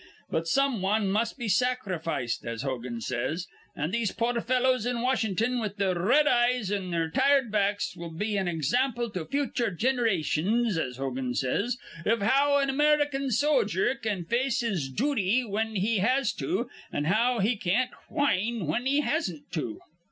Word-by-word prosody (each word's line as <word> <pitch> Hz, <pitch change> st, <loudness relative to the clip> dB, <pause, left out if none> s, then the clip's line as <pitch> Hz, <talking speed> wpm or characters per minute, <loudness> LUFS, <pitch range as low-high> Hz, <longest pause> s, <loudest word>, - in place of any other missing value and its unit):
But 165 Hz, +1 st, -1 dB
some 275 Hz, 0 st, +2 dB
wan 200 Hz, +1 st, +1 dB
must 225 Hz, +5 st, 0 dB
be 240 Hz, -4 st, -4 dB
sacrificed, 185 Hz, -, -1 dB
as 115 Hz, +1 st, -4 dB
Hogan 125 Hz, -3 st, -4 dB
says. 130 Hz, +11 st, -2 dB, 0.3 s
An' 150 Hz, +4 st, -2 dB
these 225 Hz, -2 st, 0 dB
poor 235 Hz, 0 st, -1 dB
fellows 255 Hz, -1 st, +2 dB
in 245 Hz, -1 st, -1 dB
Washin'ton 245 Hz, -1 st, +1 dB
with 210 Hz, -1 st, -4 dB
their 195 Hz, -2 st, +1 dB
r 170 Hz, -, -3 dB
red 290 Hz, +9 st, +4 dB
eyes 240 Hz, -5 st, +2 dB
an' 195 Hz, -3 st, -2 dB
their 165 Hz, -2 st, -1 dB
tired 275 Hz, -, +3 dB
backs 205 Hz, -1 st, 0 dB
will 170 Hz, 0 st, -7 dB
be 205 Hz, +6 st, -2 dB
an 195 Hz, -2 st, 0 dB
example 235 Hz, -, 0 dB
to 180 Hz, -5 st, -4 dB
future 270 Hz, -4 st, -1 dB
ginerations, 220 Hz, -1 st, +1 dB
as 130 Hz, -6 st, -2 dB
Hogan 130 Hz, -2 st, -3 dB
says, 205 Hz, -, 0 dB, 0.3 s
iv 225 Hz, +1 st, +1 dB
how 280 Hz, +6 st, +4 dB
an 275 Hz, -1 st, +1 dB
American 290 Hz, -1 st, +2 dB
sojer 245 Hz, -, +2 dB
can 215 Hz, -9 st, -3 dB
face 250 Hz, +4 st, 0 dB
his 190 Hz, -, -1 dB
jooty 235 Hz, -, +1 dB
whin 220 Hz, 0 st, -2 dB
he 210 Hz, +2 st, +1 dB
has 255 Hz, +4 st, +2 dB
to, 190 Hz, -, -2 dB, 0.2 s
an' 145 Hz, -, -1 dB
how 230 Hz, +9 st, +2 dB
he 220 Hz, +4 st, +2 dB
can't 215 Hz, +6 st, 0 dB, 0.2 s
whin 230 Hz, -, 0 dB
he 285 Hz, +2 st, +3 dB
hasn't 235 Hz, -, -2 dB
to." 145 Hz, -10 st, -3 dB
220 Hz, 165 wpm, -27 LUFS, 175-250 Hz, 0.3 s, red